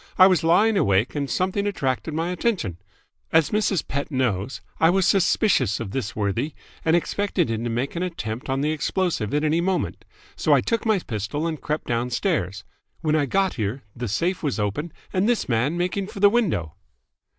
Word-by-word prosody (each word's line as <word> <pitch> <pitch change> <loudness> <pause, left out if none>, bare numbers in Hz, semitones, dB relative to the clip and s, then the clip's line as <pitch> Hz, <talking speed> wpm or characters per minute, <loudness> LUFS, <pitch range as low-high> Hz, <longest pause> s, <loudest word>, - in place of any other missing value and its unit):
I 185 - +9
was 185 -3 +4
lying 205 +6 +4
awake 100 - +2
and 140 -2 -2
something 190 +2 0
attracted 150 -4 -2
my 165 +2 -1
attention. 180 - -1 0.5
As 160 -2 +4
Mrs. 210 -5 +1
Pett 140 +1 -3
knows, 125 -5 -1 0.2
I 160 - +5
was 190 0 +3
suspicious 180 - +3
of 110 -5 -5
this 115 -2 -3
worthy 110 +8 -1 0.3
and 160 +1 +3
expected 185 - 0
him 115 0 -2
to - - -1
make 120 +7 -2
an 170 - -2
attempt 130 -10 -4
on 135 +1 0
the 150 +2 +1
explosive 155 - -1
at 150 +1 +1
any 155 +2 +2
moment: 185 +1 -1 0.3
so - - +2
I - - +6
took 230 -1 -1
my 215 -2 +4
pistol 125 - -3
and 160 -3 -3
crept 150 +1 -2
downstairs. 120 - -1 0.4
When 155 -1 +1
I 145 -2 +2
got 195 +6 +1
here, 110 +6 -2
the 120 0 -4
safe 170 - -1
was 145 -6 -1
open 105 +11 -2 0.2
and 190 +4 +2
this 240 - +1
man 130 +7 +1
making 185 +2 -1
for 200 - -9
the 205 0 +6
window." 170 - 0
155 Hz, 190 wpm, -24 LUFS, 120-185 Hz, 0.5 s, I